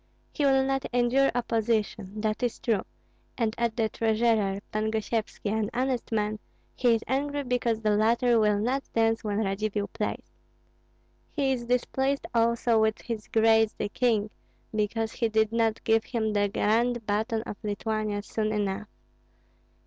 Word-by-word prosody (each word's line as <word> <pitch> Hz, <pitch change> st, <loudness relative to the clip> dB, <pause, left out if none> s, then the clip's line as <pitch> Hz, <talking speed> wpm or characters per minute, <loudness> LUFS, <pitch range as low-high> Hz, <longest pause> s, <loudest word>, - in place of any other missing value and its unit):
He 295 Hz, -, 0 dB
will 270 Hz, -1 st, +4 dB
not 270 Hz, 0 st, 0 dB
endure 245 Hz, +3 st, +3 dB
opposition, 220 Hz, -3 st, -1 dB
that 215 Hz, +1 st, -1 dB
is 245 Hz, -2 st, -1 dB
true; 220 Hz, -5 st, 0 dB, 0.6 s
and 225 Hz, -3 st, 0 dB
at 235 Hz, -1 st, 0 dB
the 225 Hz, -2 st, +2 dB
treasurer, 220 Hz, -3 st, +1 dB
Pan 215 Hz, 0 st, 0 dB
Gosyevski, 220 Hz, -1 st, -2 dB
an 215 Hz, -1 st, 0 dB
honest 255 Hz, -1 st, -1 dB
man, 215 Hz, -1 st, 0 dB, 0.4 s
he 240 Hz, -2 st, +3 dB
is 225 Hz, -, -3 dB
angry 285 Hz, +2 st, -1 dB
because 240 Hz, -3 st, 0 dB
the 215 Hz, -1 st, +2 dB
latter 230 Hz, +2 st, +3 dB
will 210 Hz, -1 st, +3 dB
not 250 Hz, +6 st, 0 dB
dance 225 Hz, 0 st, +2 dB
when 210 Hz, 0 st, 0 dB
Radzivill 205 Hz, +1 st, -2 dB
plays. 215 Hz, -2 st, -4 dB, 1.0 s
He 275 Hz, -3 st, +1 dB
is 245 Hz, -2 st, -2 dB
displeased 265 Hz, +3 st, 0 dB
also 230 Hz, 0 st, +3 dB
with 220 Hz, 0 st, +1 dB
his 225 Hz, -3 st, -5 dB
Grace 220 Hz, -1 st, +4 dB
the 205 Hz, -, -2 dB
king, 215 Hz, -2 st, +1 dB, 0.4 s
because 220 Hz, +1 st, -1 dB
he 230 Hz, -, -1 dB
did 220 Hz, 0 st, +2 dB
not 225 Hz, -1 st, 0 dB
give 225 Hz, 0 st, +2 dB
him 220 Hz, -3 st, -1 dB
the 205 Hz, -1 st, +2 dB
grand 230 Hz, +3 st, +1 dB
baton 220 Hz, +2 st, -1 dB
of 205 Hz, -, -7 dB
Lithuania 210 Hz, 0 st, -2 dB
soon 215 Hz, 0 st, -2 dB
enough. 205 Hz, 0 st, -2 dB
225 Hz, 155 wpm, -27 LUFS, 215-240 Hz, 1.0 s, will